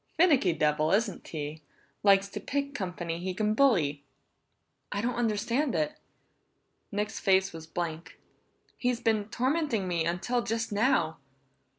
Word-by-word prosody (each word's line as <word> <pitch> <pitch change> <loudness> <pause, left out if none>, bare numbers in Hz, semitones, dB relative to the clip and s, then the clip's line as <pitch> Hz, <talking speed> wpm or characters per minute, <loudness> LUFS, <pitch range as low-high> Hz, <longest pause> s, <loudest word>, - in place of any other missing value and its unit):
"Finicky 295 - +5
devil, 155 -1 +1
isn't 205 -1 0
he? 150 0 -5 0.4
Likes 200 -1 +5
to 210 - -5
pick 280 +6 -2
company 175 -6 -4
he 185 +1 -3
can 215 +1 +1
bully!" 170 - +3 0.9
"I 200 - -2
don't 240 +4 0
understand 235 +5 0
it!" 300 0 0 1.0
Nick's 210 +1 -2
face 190 -1 +3
was 160 -1 -9
blank. 165 -1 -5 0.6
"He's 245 -2 0
been 220 -3 +1
tormenting 255 - 0
me 170 -2 0
until 190 +9 0
just 225 0 -2
now!" 200 -7 +2
205 Hz, 130 wpm, -29 LUFS, 170-240 Hz, 1.0 s, Finicky